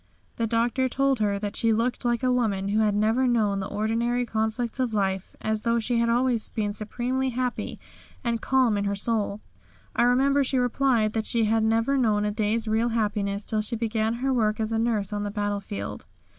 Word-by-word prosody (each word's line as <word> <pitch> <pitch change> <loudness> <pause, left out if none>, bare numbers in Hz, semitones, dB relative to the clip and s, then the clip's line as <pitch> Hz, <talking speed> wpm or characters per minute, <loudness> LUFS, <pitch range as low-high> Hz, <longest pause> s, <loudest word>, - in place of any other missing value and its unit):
The 230 - 0
Doctor 235 +3 +1
told 275 -1 +1
her 205 -2 +1
that 205 0 -4
she 230 - +2
looked 230 +3 0
like 240 +1 0
a 255 - +3
woman 205 -6 0
who 210 +2 +1
had 210 -2 +2
never 220 +5 +2
known 215 -5 +1
the 195 - -3
ordinary 230 +4 0
conflicts 220 +2 -2
of 245 -4 0
life, 190 -2 -1
as 220 0 -1
though 230 +1 +1
she 235 +1 0
had 235 0 +2
always 240 -1 +2
been 210 -2 -2
supremely 245 +5 -1
happy 250 0 -3 0.4
and 235 -2 -1
calm 255 -5 +2
in 200 - -1
her 200 0 0
soul. 210 0 0 0.5
I - - +2
remember 270 +4 +3
she 265 0 -1
replied 245 -3 +2
that 220 -1 -2
she 230 -2 +2
had 220 +1 +2
never 225 +5 +2
known 210 -4 +2
a 210 - 0
day's 215 +2 -1
real 225 +2 +1
happiness 205 -3 -1
till 215 -1 0
she 225 +3 -2
began 225 0 -1
her 265 +2 -1
work 215 -3 +1
as 220 0 -1
a 225 - 0
nurse 220 -4 0
on 205 - -2
the 205 - -2
battlefield. 200 - -4
225 Hz, 205 wpm, -26 LUFS, 210-240 Hz, 0.5 s, a